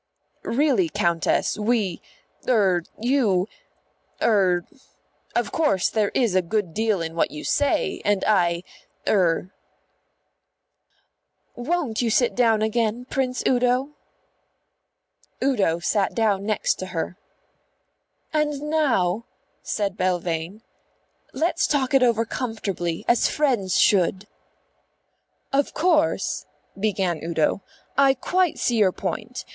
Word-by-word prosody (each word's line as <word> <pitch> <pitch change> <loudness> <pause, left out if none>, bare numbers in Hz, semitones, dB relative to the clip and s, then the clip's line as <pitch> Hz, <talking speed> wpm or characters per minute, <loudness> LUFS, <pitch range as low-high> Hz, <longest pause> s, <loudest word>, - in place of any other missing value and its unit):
"Really, 250 - +1
Countess, 170 +5 0
we 210 -5 0 0.5
er 195 -7 +3 0.2
you 220 -7 +2 0.7
er 185 -5 +2 0.7
Of - - 0
course 290 - +1
there 215 -2 +1
is 235 -7 +2
a 185 - +3
good 180 -1 -2
deal 215 -4 0
in 165 0 -5
what 165 - +1
you 150 - -8
say, 285 -1 0
and 205 -1 +1
I 175 -4 +2 0.4
er 185 -2 +1 1.0
" - - -47
"Won't 265 -3 -1
you 235 - +1
sit 240 +2 +2
down 225 -3 +3
again, 225 +2 0
Prince 255 -2 -1
Udo?" 250 +2 +2 1.5
Udo 210 -12 +2
sat 195 +3 0
down 205 -3 +1
next 215 - 0
to 185 - -5
her. 180 +1 -4 1.1
"And 300 -2 0
now," 230 - +1 0.4
said 200 -2 -2
Belvane, 180 +2 -2 0.7
"let's 335 +1 0
talk 275 -2 0
it 270 - +5
over 230 -2 +3
comfortably 200 -9 -3
as 240 - +3
friends 245 -11 +1
should." 190 0 +3 1.3
"Of 280 0 +1
course," 325 -1 +1 0.3
began 195 -5 -1
Udo, 165 +3 0 0.3
"I 275 0 +4
quite 360 +6 0
see 240 - 0
your 200 -4 +4
point. 240 +6 -5
215 Hz, 110 wpm, -23 LUFS, 185-255 Hz, 1.5 s, it